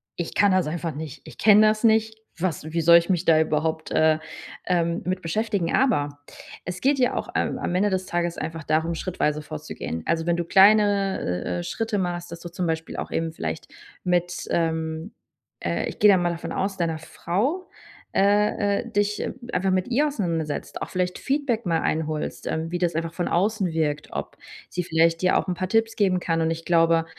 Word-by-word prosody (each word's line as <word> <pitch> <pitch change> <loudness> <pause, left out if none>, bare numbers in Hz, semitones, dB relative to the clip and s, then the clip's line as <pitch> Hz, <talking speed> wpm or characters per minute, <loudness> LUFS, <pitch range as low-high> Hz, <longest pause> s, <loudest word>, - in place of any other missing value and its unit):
„Ich 175 - -4
kann 205 -1 +4
das 185 -1 +3
einfach 165 -1 -3
nicht. 150 -1 -7
Ich - - -12
kenne 215 0 +6
das 215 +1 +1
nicht. 220 -1 +3 0.2
Was 170 -4 -2
wie 165 - +1
soll 170 +1 +8
ich 170 +1 0
mich 180 -1 0
da 160 -1 +5
überhaupt, 160 0 -1
äh, 155 0 +4 0.5
ähm, 170 -1 0
mit 185 +1 -1
beschäftigen?“ 195 0 -1
Aber, 145 - +1 0.5
es 180 +1 -5
geht 275 +2 +3
ja 250 - +2
auch, - - -3
ähm, - - 0
am 180 - -2
Ende 200 +2 +2
des 185 0 -1
Tages 175 -2 -1
einfach 160 0 -5
darum, 160 +3 0
schrittweise 155 -4 -1
vorzugehen. 150 - -6
Also, 165 0 0
wenn 170 0 +1
du 175 - -2
kleine, 200 +1 +5
äh, 90 0 -2
äh, - - -4
Schritte 220 - -2
machst, 175 -1 -3
dass 170 - -7
du 175 - -8
zum 180 +1 -3
Beispiel 160 0 -3
auch - - -5
eben 165 0 -1
vielleicht 80 - -5 0.4
mit, 175 0 0
ähm, 160 +2 -1 0.5
äh, - - -1
ich - - -9
gehe 210 - +7
da 190 - +5
mal 175 -1 +1
davon 170 0 -6
aus, 195 0 -2
deiner 165 -3 -1
Frau, 230 - -2 0.5
äh, 205 0 +3
äh, 235 - -10
dich 205 -1 0 0.3
einfach 190 +1 +1
mit 185 +4 0
ihr 280 +5 +2
auseinandersetzt, 170 - -3
auch - - -4
vielleicht 180 -1 -1
Feedback 270 -5 -1
mal 165 -2 +1
einholst, 155 -1 -2
ähm, 160 +1 -2
wie 175 - -1
das 175 -2 0
einfach 165 0 -2
von 175 0 -2
außen 200 +2 +1
wirkt. 150 -2 -1
Ob - - -5 0.3
sie 180 - -2
vielleicht 165 0 +2
dir 185 0 +3
auch - - -1
'n - - +1
paar 185 +1 -2
Tipps 225 +2 +2
geben 190 -3 +2
kann. 165 -1 0
Und 160 - +1
ich 165 0 -4
glaube, 165 -1 +3
175 Hz, 205 wpm, -24 LUFS, 160-200 Hz, 0.5 s, soll